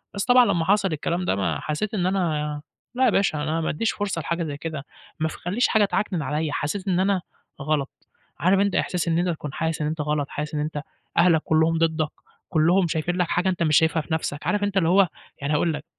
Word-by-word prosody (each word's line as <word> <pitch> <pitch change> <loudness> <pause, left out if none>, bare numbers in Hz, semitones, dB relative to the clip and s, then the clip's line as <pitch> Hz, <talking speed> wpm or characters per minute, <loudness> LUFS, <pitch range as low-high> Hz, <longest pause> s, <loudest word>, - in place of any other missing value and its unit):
بس 200 0 -1
طبعًا 250 0 +6
لمّا 170 -7 +1
حصَل 195 -2 +2
الكلام 170 +4 -2
ده - - +1
ما 95 -1 -1
حسّيت 175 +8 -3
إن 180 -4 0
أنا 155 -6 -1 0.3
لا 260 +1 +3
يا - - +5
باشا 195 -7 +1
أنا 155 - -2
ما 165 - 0
بادّيش 160 +8 0
فرصة 200 -5 -3
لحاجة 170 +2 -2
زي 145 -3 -4
كده 155 -2 -5 0.3
ما 160 - +1
ف - - -8
خلّيش 200 +8 0
حاجة 215 -2 +3
تعكنن 195 -3 -1
عليَّ، 150 +1 -1
حسيت 185 +8 -3
إن 180 -1 +2
أنا 190 -1 +2 0.4
غلط. 145 -1 0 0.5
عارف 190 +2 +3
أنت 200 -1 +1
إحساس 180 -1 0
إن 165 0 +2
أنت 180 0 +1
تكون 150 -4 -4
حاسس 160 -1 -2
إن 150 - 0
أنت 155 0 -2
غلط، 150 -1 -1
حاسس 150 +1 -5
إن - - -1
أنت 150 -1 -3 0.4
أهلك 170 -2 +5
كلّهم 160 +1 +3
ضدك، 160 -2 +1 0.4
كلّهم 175 +2 +3
شايفين 165 +2 -1
لك 180 - +1
حاجة 180 +3 +1
أنت 180 -2 0
مش 155 -3 +4
شايفها 160 0 +3
في 160 - -5
نَفْسك. 155 -2 -3
عارف 205 -1 +1
أنت 200 -1 -1
اللي 165 -3 +3
هو 190 +1 +5 0.3
يعني 140 +2 -1
هاقول 160 +2 +2
لك، 150 0 -6
165 Hz, 235 wpm, -24 LUFS, 155-190 Hz, 0.5 s, طبعًا